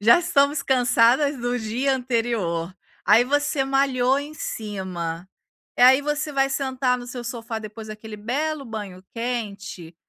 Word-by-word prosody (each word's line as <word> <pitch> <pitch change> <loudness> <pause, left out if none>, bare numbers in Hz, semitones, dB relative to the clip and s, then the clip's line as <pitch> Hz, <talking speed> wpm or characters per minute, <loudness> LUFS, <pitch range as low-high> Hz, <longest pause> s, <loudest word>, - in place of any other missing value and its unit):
Já 225 +7 +7
estamos 290 -4 +2
cansadas 255 +2 +3
do 245 +1 -1
dia 245 +5 0
anterior. 225 -9 -1 0.3
Aí 220 +3 +7
você 290 0 +1
malhou 270 -1 +2
em 290 +2 -6
cima 185 - -5 0.5
e - - +4
aí 260 +2 +8
você 295 +1 -2
vai 270 -1 +2
sentar 260 -2 0
no 245 - -9
seu 245 -1 -7
sofá 230 -1 -4
depois 215 0 -9
daquele 215 0 -8
belo 280 +7 -2
banho 205 -6 -7
quente. 205 -8 -5
245 Hz, 145 wpm, -23 LUFS, 215-270 Hz, 0.5 s, aí